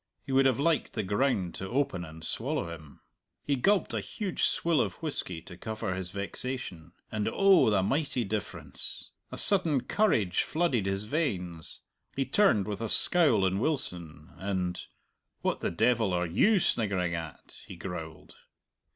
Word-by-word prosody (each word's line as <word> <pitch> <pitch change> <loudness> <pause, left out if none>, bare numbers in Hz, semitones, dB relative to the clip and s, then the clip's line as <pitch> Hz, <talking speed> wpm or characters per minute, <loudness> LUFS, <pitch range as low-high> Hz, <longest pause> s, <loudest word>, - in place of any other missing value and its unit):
He - - -6
would 135 0 +5
have 130 -2 +1
liked 160 +2 +1
the 110 - -1
ground 100 -2 0
to 95 - -6
open 125 -9 0
and 80 0 -8
swallow 85 - -1
him. 75 -3 -13 0.4
He 140 - +2
gulped 195 +10 +2
a - - 0
huge 200 -5 -4
swill 165 -2 +2
of - - -2
whisky 95 - -4
to 90 - -11
cover 110 +1 -4
his 95 -1 -4
vexation; 100 -4 -5 0.2
and 105 -1 -1
oh, 195 - +5
the 100 -3 +2
mighty 135 +2 0
difference! 105 -1 -5 0.2
A - - -6
sudden 170 -9 +3
courage 115 - +2
flooded 150 - 0
his 95 +1 +1
veins. 95 - -3 0.3
He 135 - 0
turned 130 - +3
with 105 +1 -4
a 115 - -2
scowl 140 - +4
on 95 +1 +1
Wilson, 85 - -3
and, 95 -2 -2 0.6
"What - - 0
the - - -1
devil 110 +1 +2
are 90 0 +1
you 190 - +3
sniggering 95 - +1
at?" 80 -2 -7
he - - -8
growled. 85 -3 -7
105 Hz, 160 wpm, -29 LUFS, 90-140 Hz, 0.6 s, would